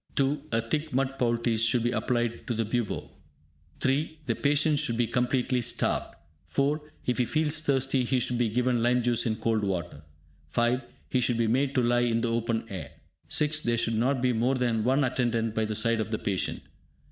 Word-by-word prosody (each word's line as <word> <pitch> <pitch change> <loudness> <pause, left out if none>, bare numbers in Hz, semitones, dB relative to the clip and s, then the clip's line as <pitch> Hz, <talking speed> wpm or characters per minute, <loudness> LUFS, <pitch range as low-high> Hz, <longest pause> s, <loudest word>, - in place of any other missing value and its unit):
(2) 140 +1 +1
A 115 0 +2
thick 150 +7 -2
mud 135 0 0
poultice 115 -2 +1
should 115 +1 +2
be 120 - +1
applied 120 -2 -1
to 120 - -1
the 115 0 0
bubo. 115 0 -2 0.7
(3) 145 +4 0
The - - +1
patient 145 +1 +2
should 130 -6 -1
be 120 - +2
completely 125 +1 0
starved. - - -1 0.3
(4) 145 +3 0 0.2
If 125 +1 0
he 125 - +3
feels 155 +2 0
thirsty, 135 -3 +1
he 125 +1 +1
should 120 0 -1
be 120 -2 +2
given 125 +1 +1
lime 120 +1 +2
juice 120 0 +1
in 110 - 0
cold 110 -1 0
water. 90 -6 -3 0.5
(5) 120 - +1 0.3
He 130 - +1
should 120 -1 +1
be 115 - +2
made 130 +5 +1
to 130 - +3
lie 120 0 +3
in 115 -1 +1
the 120 - 0
open 115 -1 -1
air. 85 -7 -7 0.4
(6) 155 -1 +1
There 120 -3 0
should 115 0 +1
not 125 +3 +1
be 125 -1 +3
more 120 +4 +1
than 120 -4 0
one 135 +4 +3
attendant 120 -3 0
by 110 0 0
the 110 0 -3
side 115 +1 +2
of 110 - -2
the 110 - -1
patient. 95 -3 -2
120 Hz, 205 wpm, -28 LUFS, 115-135 Hz, 0.7 s, he